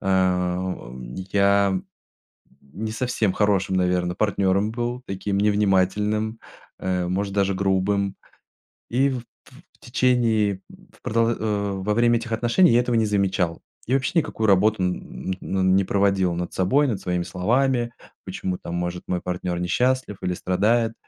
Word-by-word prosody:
Э, 90 -2 +1
у, 90 -9 -5 0.2
э, 95 - -4
я 100 -1 +3 0.8
не 95 +11 -6
совсем 115 -4 0
хорошим, 100 -3 +1
наверно, 90 -1 +1
партнером 100 0 +1
был, 120 +1 -3
таким 100 +1 -2
невнимательным, 105 +2 +1 0.4
э, 90 -1 -1
может 100 +2 -2
даже 100 -1 +1
грубым, 100 +1 0 0.7
и 135 +4 +2
в 130 -2 -2
т - - -11 0.5
в - - -30
течение, 115 -6 +1
в - - -19
продо 115 +1 +1
э, 105 -2 -1
во 95 +2 -1
время 120 +1 +3
этих 115 0 -7
отношений 120 +8 +3
я 120 - +5
этого 120 -1 0
не 115 - +3
замечал. 95 -4 0 0.2
И, 125 - -1
вообще, 135 +5 +1
никакую 110 -7 -2
работу 100 +1 +3
н 90 -2 -3
ну, 95 0 -2
не 95 +1 +4
проводил 95 -2 +1
над 90 0 -4
собой, 135 +11 +2
над 105 -6 -2
своими 90 -1 -1
словами. 120 +6 0 0.3
Почему 90 -1 -4
там, 85 - -6
может, 90 0 -3
мой 90 -1 -1
партнер 90 -1 -3
не 90 - -2
счастлив 130 0 +1
или 90 -1 -1
страдает? 110 +6 +1
100 Hz, 155 wpm, -23 LUFS, 95-115 Hz, 0.8 s, я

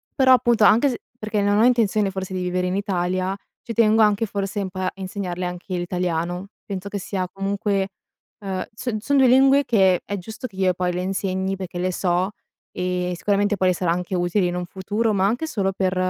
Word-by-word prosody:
però 260 -2 +6
appunto 240 -3 +3
anche 230 +7 +5
s 245 - -2 0.2
perché 215 -1 -1
non 205 +1 +2
ho - - +5
intenzione, 215 -5 +2
forse 190 0 -5
di 185 - -2
vivere 180 0 -1
in 180 - -1
Italia, 185 -1 -1 0.3
ci 230 - -5
tengo 220 0 +4
anche 210 +1 +3
forse 200 0 -3
un 190 - -3
po' 185 - -8
a 185 - 0
insegnarle 185 -2 -4
anche 180 +1 -5
l'italiano, 175 +1 -2 0.2
penso 195 -1 -5
che 200 0 -4
sia 185 -1 -3
comunque 195 0 -1 0.5
ehm, 190 -2 -3
s 230 0 -3
son 280 +6 +1
2 265 - +6
lingue 270 +3 +5
che 190 -5 +3
è 200 - -3
giusto 220 +7 -8
che 190 - -17
io 185 -1 +2
poi 180 0 -1
le 180 - -2
insegni, 190 0 -1
perché 180 -2 -6
le 185 +1 0
so, 180 +2 0 0.4
e 180 0 -2
sicuramente 205 +1 +1
poi 185 0 +3
le - - +3
sarà 175 0 -1
anche 180 +2 -2
utili 180 +2 +1
in 175 - -2
un 180 - -3
futuro, 205 +5 -1
ma 190 -1 +2
anche 245 +9 -1
solo 195 -8 -1
per 185 -1 0
195 Hz, 210 wpm, -23 LUFS, 180-210 Hz, 0.5 s, però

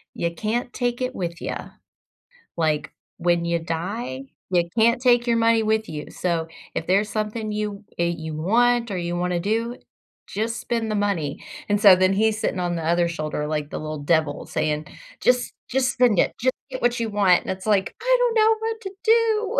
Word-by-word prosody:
"You 170 0 -1
can't 235 +6 -2
take 245 -1 -1
it 255 0 -1
with 170 -2 -4
ya. - - -5 0.9
Like, 155 -3 0 0.3
when 175 0 +1
you 170 0 +1
die, 165 - -4 0.3
you 175 -2 +2
can't 235 +2 +4
take 245 -2 +4
your 235 -1 +2
money 230 0 +3
with 220 0 +1
you, 150 -1 -6
so 170 -3 -1 0.3
if 160 - -2
there's 200 +3 +3
something 215 0 -3
you 210 -1 -4
that 170 0 0
you 160 -1 -5
want 235 +7 +2
or 190 - -2
you 175 0 -2
wanna 175 0 0
do, 225 +5 -1 0.5
just 225 +3 -2
spend 230 -2 -2
the 215 - 0
money." 195 -9 -1 0.3
And 205 0 +2
so, 195 -3 +9
then 185 +1 +3
he's 220 +2 +2
sitting 200 -4 -1
on 175 -1 -1
the 165 - -3
other 170 +1 +2
shoulder 155 -2 -3
like 150 -1 -2
the - - -5
little 155 -1 -5
devil 155 -1 0
saying, 155 0 -2 0.3
"Just 250 0 +2 0.2
just 255 -1 +1
spend 240 -7 +3
it, - - +2
just 255 +1 +2 0.2
get 260 -1 -6
what 240 0 +2
you 225 -1 -1
want," 195 -4 +4
and - - -8
it's 190 +1 -6
like, 200 -3 +1
"I - - +4
don't 485 -2 +2
know 440 0 +5
what 450 0 -3
to 385 - -6
do." 450 -1 +3
205 Hz, 200 wpm, -23 LUFS, 170-240 Hz, 0.9 s, so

